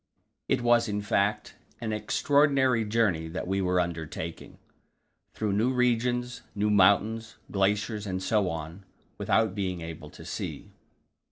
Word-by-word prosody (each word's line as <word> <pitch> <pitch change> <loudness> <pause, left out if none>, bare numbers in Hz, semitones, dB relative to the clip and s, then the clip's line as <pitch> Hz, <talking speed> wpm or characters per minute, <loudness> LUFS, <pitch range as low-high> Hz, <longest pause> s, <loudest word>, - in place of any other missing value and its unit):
It 120 - +1
was, 120 -1 +4
in 105 0 -2
fact, 100 0 0 0.3
an 110 -2 -3
extraordinary 135 +1 +2
journey 105 -7 +1
that 90 +3 -4
we 95 +1 0
were 90 -1 +2
undertaking, 85 -3 -4 0.8
through 105 -2 -1
new 110 +6 +2
regions, 125 0 0
new 105 +1 +1
mountains, 110 +3 +3 0.2
glaciers, 105 +2 0
and 95 -1 -2
so 105 -3 +2
on, 80 +3 -6 0.4
without 110 -4 +2
being 95 -3 -3
able 80 -1 -8
to - - -13
see. - - -6
105 Hz, 135 wpm, -28 LUFS, 95-115 Hz, 0.8 s, was